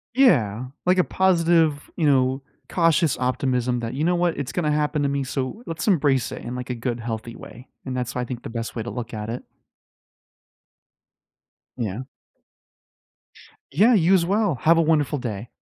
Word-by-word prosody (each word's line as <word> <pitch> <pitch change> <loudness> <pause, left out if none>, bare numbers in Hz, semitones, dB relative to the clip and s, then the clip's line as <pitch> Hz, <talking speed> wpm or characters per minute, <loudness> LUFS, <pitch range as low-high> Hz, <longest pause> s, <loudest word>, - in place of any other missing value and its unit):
Yeah. 130 - +3 0.2
Like 180 +1 +3
a 180 - +5
positive, 165 -6 +2
you 165 - 0
know, 130 -1 +2 0.3
cautious 165 -4 +2
optimism 125 -1 0
that, 115 0 -4
"You 140 +4 -2
know 175 +2 +2
what? 175 -1 0
It's 140 -3 -4
gonna 155 -4 0
happen 150 0 0
to 140 - +1
me, 140 0 -1
so 135 - -4
let's 165 +6 -4
embrace 140 - +2
it - - -7
in, 120 +1 -5
like, 125 0 -6
a 125 - -2
good 120 0 -3
healthy 115 0 -5
way," 120 +4 -12 0.2
and 130 - -4
that's 125 -2 -3
why 125 - -1
I - - -2
think 120 -1 -7
the - - -6
best 115 0 -5
way 115 - -3
to 120 - -5
look 120 -1 -6
at 105 0 -5
it. 120 +2 -5 2.3
Yeah. 110 -2 -3 1.7
Yeah, 210 - +5
you 185 -3 +4
as 170 -3 +2
well. 200 -2 +1
Have 165 +1 +5
a - - +5
wonderful 150 -3 +1
day. 115 -2 -5
135 Hz, 185 wpm, -23 LUFS, 120-165 Hz, 2.3 s, a